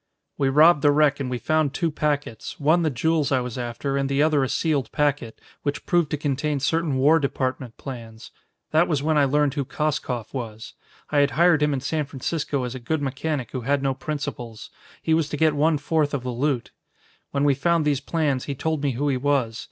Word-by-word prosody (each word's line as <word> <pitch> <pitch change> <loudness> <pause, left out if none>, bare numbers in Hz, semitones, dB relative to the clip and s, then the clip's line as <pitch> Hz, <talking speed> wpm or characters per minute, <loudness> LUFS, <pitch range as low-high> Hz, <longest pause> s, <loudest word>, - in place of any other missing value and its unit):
"We 135 - +1
robbed 150 +3 +6
the 145 - +5
wreck 145 0 +3
and 135 -2 -3
we 125 - -2
found 155 +1 0
two 165 -2 0
packets, 145 -7 -3
one 155 +4 +3
the 160 - +2
jewels 150 +2 0
I 130 - +3
was 125 -2 -5
after, 125 +3 -3
and 135 0 0
the 140 +1 +2
other 155 -3 +3
a 130 - -1
sealed 145 -8 0
packet, 145 -6 -1 0.2
which 145 0 -3
proved 175 -4 +2
to 150 - -1
contain 145 0 -1
certain 150 0 0
War 150 +5 +5
Department 130 -4 -3
plans. 115 0 -9 0.4
That 160 +3 +4
was 150 -4 0
when 155 +1 +1
I 145 -1 +4
learned 145 +1 +2
who 145 -2 -1
Koskoff 135 -6 -3
was. 110 -4 -6 0.4
I 145 - +3
had 140 0 +4
hired 170 -2 +5
him 150 0 +3
in 135 -2 -1
San 150 +2 -1
Francisco 140 0 -3
as 125 -1 -4
a 130 - -6
good 145 +5 -2
mechanic 135 -1 -3
who 130 - -4
had 140 +3 0
no 135 -1 +1
principles. 135 -7 -6 0.3
He 160 - +2
was 160 -2 +1
to 150 - -3
get 160 0 +3
one 155 +2 +3
fourth 145 0 0
of 130 - -4
the 125 - -3
loot. 130 0 -1 0.6
When 140 0 -1
we 145 -1 +4
found 165 +3 +1
these 145 -2 +1
plans, 145 -4 -1
he 140 - -4
told 155 +2 -2
me 140 -2 0
who 140 +5 -1
he 135 -2 +1
was. 130 -5 0
145 Hz, 220 wpm, -24 LUFS, 130-155 Hz, 0.6 s, robbed